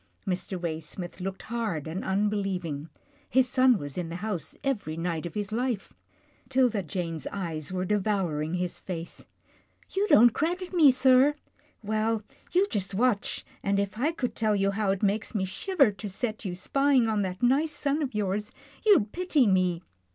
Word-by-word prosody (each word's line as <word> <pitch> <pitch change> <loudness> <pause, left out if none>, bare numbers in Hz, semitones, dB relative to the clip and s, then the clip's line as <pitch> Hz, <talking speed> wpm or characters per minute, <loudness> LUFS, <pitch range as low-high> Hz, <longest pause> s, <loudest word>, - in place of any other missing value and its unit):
Mr. 185 0 -2
Waysmith 170 +2 -5
looked 190 +1 -4
hard 220 -10 -3
and 160 +4 -4
unbelieving. 190 -6 -1 0.4
His 260 +1 +4
son 255 -2 +4
was 145 +1 -5
in 170 -2 -3
the 165 - -5
house 185 -4 -4
every 205 - -2
night 170 -1 -2
of 165 - -11
his 205 -1 -3
life. 235 -2 -2 0.6
'Tilda 250 -5 +3
Jane's 165 -1 -4
eyes 165 -6 -4
were 185 0 -1
devouring 185 -6 0
his 180 -1 -2
face. 170 -2 -6 0.3
" - - -34
You 400 +2 +2
don't 240 - +7
credit 355 - -2
me, 320 -5 +7
sir. 260 +2 +5 0.5
Well, 220 +1 0 0.3
you 370 +2 +4
just 195 -3 -2
watch, 230 -1 0 0.2
and 200 0 +1
if 200 0 -2
I 295 +6 +2
could 265 -7 -3
tell 215 -2 +1
you 195 0 +2
how 205 0 -1
it 195 +1 0
makes 210 +3 0
me 190 -2 +1
shiver 275 - +2
to 205 +1 -7
set 215 +2 -3
you 180 -2 -3
spying 275 +4 +2
on 215 -2 +1
that 185 +2 -4
nice 280 +6 +3
son 290 +1 -1
of 265 -6 -3
yours, 210 0 -1 0.3
you'd 380 - +5
pity 345 -7 +2
me. 185 -3 +2
205 Hz, 175 wpm, -28 LUFS, 180-250 Hz, 0.6 s, don't